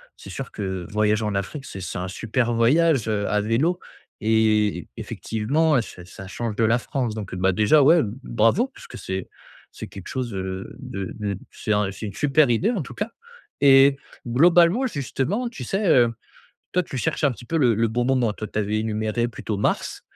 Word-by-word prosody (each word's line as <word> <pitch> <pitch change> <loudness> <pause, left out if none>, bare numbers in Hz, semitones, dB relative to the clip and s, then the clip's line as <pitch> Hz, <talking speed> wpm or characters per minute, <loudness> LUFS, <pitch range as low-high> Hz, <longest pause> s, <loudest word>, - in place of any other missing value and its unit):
c'est - - -12
sûr - - -6
que, - - -8 0.2
heu, - - -10
voyager 105 +1 +1
en 105 -1 -1
Afrique 125 +8 -4
c'est 95 - -8
c'est 90 - -5
un 90 +1 -3
super 115 +5 -1
voyage, 135 +2 +3
heu, 105 -2 0
à 105 - +1
vélo, 135 - +1 0.4
et 110 -4 +2
effectivement 135 +5 0
ça 90 -5 -11
ça 95 +1 -11
change 110 +2 -4
de 115 - +1
la 115 +2 +3
France. 120 -3 -3
Donc, 100 -4 -6
heu, - - -4
bah 95 +1 +2
déjà, 110 +10 +4
ouais, 160 +4 +6 0.2
bravo, 115 - +2
puisque 265 - -12
c'est 95 0 -5 0.4
c'est - - -8
quelque 95 - -10
chose 130 -2 -3
de, 95 - -5
heu, 95 0 -5
de 95 -1 -6 0.2
de - - -6
c'est 110 - -2
un 105 -2 +1
c'est 100 +3 -7
une 100 - -6
super 145 +2 +3
idée, 165 - +2
en 205 -8 -1
tout - - -10
cas. 210 +3 -3 0.5
Et 135 0 +7 0.3
globalement, 170 - +4
justement, 195 - -2
tu 140 - -8
sais, 195 - -1
heu, 120 -6 +5 0.6
toi 180 - +2
tu 140 - -7
cherches 125 - -1
un 140 - +3
petit 120 - -12
peu 165 +7 -2
le 120 -6 +4
le 115 +2 +1
bon 120 +3 -1
moment? 125 -4 +2
Toi, 110 +1 -6
tu - - -12
avais 105 +1 0
énuméré 110 +1 -1
plutôt 110 -3 -5
mars, 100 - -1
115 Hz, 205 wpm, -23 LUFS, 105-140 Hz, 0.6 s, Et